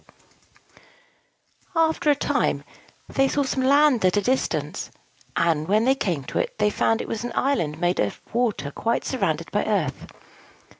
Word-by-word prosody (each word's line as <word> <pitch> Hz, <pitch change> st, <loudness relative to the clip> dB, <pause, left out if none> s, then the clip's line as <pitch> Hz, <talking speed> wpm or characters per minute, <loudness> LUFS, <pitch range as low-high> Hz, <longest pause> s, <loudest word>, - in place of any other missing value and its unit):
After 320 Hz, -2 st, +2 dB
a 290 Hz, -, +5 dB
time, -, -, 0 dB, 0.4 s
they 270 Hz, 0 st, +2 dB
saw 285 Hz, +1 st, +1 dB
some 265 Hz, 0 st, -1 dB
land 280 Hz, -2 st, +4 dB
at 185 Hz, +2 st, +3 dB
a -, -, +3 dB
distance; 260 Hz, +4 st, -1 dB, 0.5 s
and, 160 Hz, -2 st, +1 dB
when 215 Hz, +4 st, +3 dB
they 265 Hz, -, +5 dB
came 175 Hz, -, -2 dB
to -, -, -3 dB
it, -, -, -2 dB
they 210 Hz, -, +2 dB
found 225 Hz, +2 st, +1 dB
it -, -, -6 dB
was 225 Hz, 0 st, -4 dB
an 240 Hz, -, -4 dB
island 165 Hz, -, 0 dB
made 175 Hz, +1 st, +1 dB
of 100 Hz, -, -1 dB
water 220 Hz, -12 st, 0 dB
quite 230 Hz, +9 st, -1 dB
surrounded 170 Hz, -, -1 dB
by 205 Hz, -, +1 dB
earth. 185 Hz, -11 st, -1 dB
225 Hz, 160 wpm, -24 LUFS, 170-270 Hz, 0.5 s, a